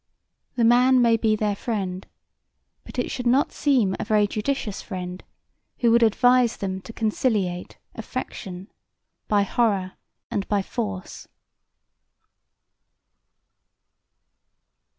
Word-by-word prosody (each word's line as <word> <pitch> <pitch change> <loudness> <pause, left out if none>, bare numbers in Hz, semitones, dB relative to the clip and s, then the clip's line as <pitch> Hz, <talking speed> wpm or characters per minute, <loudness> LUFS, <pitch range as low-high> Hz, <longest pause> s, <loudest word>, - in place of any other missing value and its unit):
The 240 - +1
man 250 +3 +5
may 235 -2 +5
be 220 -1 +2
their 210 -1 0
friend, 195 -4 -4 0.8
but - - -11
it 245 - -1
should 250 -1 -3 0.2
seem 260 -9 +2
not - - -4
a - - -1
very 210 -1 +3
judicious 215 0 -3
friend, 180 -2 -6 0.5
who 235 -2 +3
would 235 +1 +5
advise 245 +2 +4
them 190 -1 -4
to 225 - -10
conciliate 210 -5 -1 0.2
affection 185 -1 -7 0.6
by 205 -1 +3
horror 200 -3 0 0.4
and 200 - -2
by 205 -2 +1
force. 200 -5 -5
215 Hz, 110 wpm, -24 LUFS, 195-240 Hz, 0.8 s, man